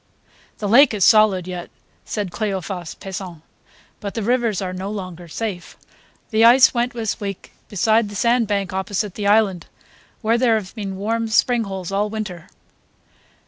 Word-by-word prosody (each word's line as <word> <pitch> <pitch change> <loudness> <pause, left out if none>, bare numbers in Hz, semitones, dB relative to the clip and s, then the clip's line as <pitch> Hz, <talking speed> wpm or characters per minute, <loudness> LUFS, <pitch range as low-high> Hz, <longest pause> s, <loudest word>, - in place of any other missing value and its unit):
"The 210 - -3
lake 245 +3 +6
is 195 - +3
solid 210 -5 +4
yet," 180 -1 -6 0.4
said 205 -4 -3
Cleophas 190 -5 -4
Pesant, 185 -4 -8 0.6
"but 200 -1 -6
the 225 - -2
rivers 235 -3 +1
are 185 -2 -4
no 190 +2 -5
longer 185 -4 -7
safe. 185 0 -5 0.5
The 220 0 +3
ice 245 +3 +7
went 240 0 0
this 225 -2 -3
week 200 -3 -6 0.2
beside 220 +2 +2
the 205 - -9
sand 235 +1 +2
bank 200 -3 -1
opposite 190 +1 -2
the 205 0 -3
island, 200 -5 +2 0.6
where 230 +2 +2
there 235 -3 +3
have 205 -4 -4
been 195 -4 -5
warm 225 +3 -1
spring 230 +1 +2
holes 190 -2 -6
all 205 +2 0
winter." 210 -6 -6
205 Hz, 160 wpm, -21 LUFS, 190-225 Hz, 0.6 s, ice